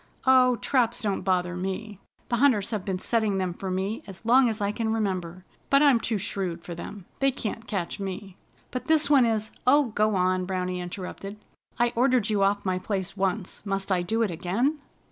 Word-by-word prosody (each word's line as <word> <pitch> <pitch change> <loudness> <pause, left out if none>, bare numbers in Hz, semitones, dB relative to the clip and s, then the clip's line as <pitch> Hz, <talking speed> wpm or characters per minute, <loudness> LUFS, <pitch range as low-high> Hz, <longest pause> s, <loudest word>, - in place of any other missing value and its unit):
"Oh, 255 -1 +6
traps 240 -2 0
don't 200 -2 0
bother 180 -2 0
me. 195 +3 -4 0.3
The 240 - +1
Hunters 240 -6 +3
have 210 -4 -2
been 190 -1 -2
setting 215 0 0
them 185 -2 -1
for 190 +2 -5
me 190 +4 -2
as 195 +2 -10
long 250 +1 +5
as 220 0 -3
I 200 0 0
can 220 +1 -2
remember. 185 -5 -2 0.2
But 275 +1 +5
I'm 275 -5 +5
too 225 -1 -1
shrewd 185 -3 -3
for 170 - -6
them. 175 +3 -8
They 275 - +4
can't 225 -3 -5
catch 195 -3 -3
me." 195 -1 -6 0.4
"But 255 - -4
this 310 -2 +3
one 265 -5 +6
is 220 -1 -1
" - - -29
"Oh, 285 -1 +5
go 215 -1 +1
on!" 185 0 +1
Browny 185 -1 -2
interrupted. 190 +3 -7 0.4
"I 240 0 +2
ordered 245 -3 +2
you 205 -2 +1
off 200 +1 +2
my 185 -1 0
place 190 -1 -3
once. 195 0 -2
Must 195 -1 -3
I 180 -1 +3
do 225 +6 0
it 210 - 0
again?" 200 - 0
205 Hz, 200 wpm, -26 LUFS, 185-235 Hz, 0.4 s, Oh